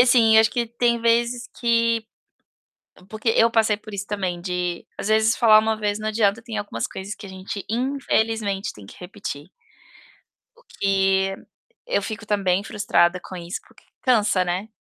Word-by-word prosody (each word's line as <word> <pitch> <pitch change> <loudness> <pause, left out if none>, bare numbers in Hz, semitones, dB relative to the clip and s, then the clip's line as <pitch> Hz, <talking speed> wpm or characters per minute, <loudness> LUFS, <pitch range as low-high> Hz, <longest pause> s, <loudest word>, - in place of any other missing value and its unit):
e - - +10
assim: 240 -3 +5
eu - - +9
acho 220 - +3
que 240 -1 -1
tem 235 0 0
vezes 235 +1 +1
que 230 -1 +1 1.0
porque 215 +2 -4
eu 230 0 +4
passei 220 -2 +3
por 215 -1 -11
isso 200 +1 -4
também 185 -4 -3
de, 180 -1 -3
às - - -4
vezes, 220 +1 +3
falar 220 -3 +7
uma 220 0 0
vez 210 -1 -1
não 215 - -2
adianta 215 -1 +1
e - - -25
tem 230 -1 -5
algumas 205 - -3
coisas 195 +2 -6
que 200 -1 -11
a - - -10
gente 190 +1 -7
infelizmente 225 -5 -1
tem 105 -2 -14
que - - -14
repetir. 180 -5 -7 1.1
O 480 - -22 0.2
que 195 -1 +2 0.5
eu - - +1
fico 220 0 -6
também 195 -2 +1
frustrada 180 -4 +1
com 185 - -10
isso 175 +1 -5
porque - - -23 0.2
cansa, 215 -7 +3
né? 180 +4 -2
215 Hz, 180 wpm, -23 LUFS, 195-230 Hz, 1.1 s, e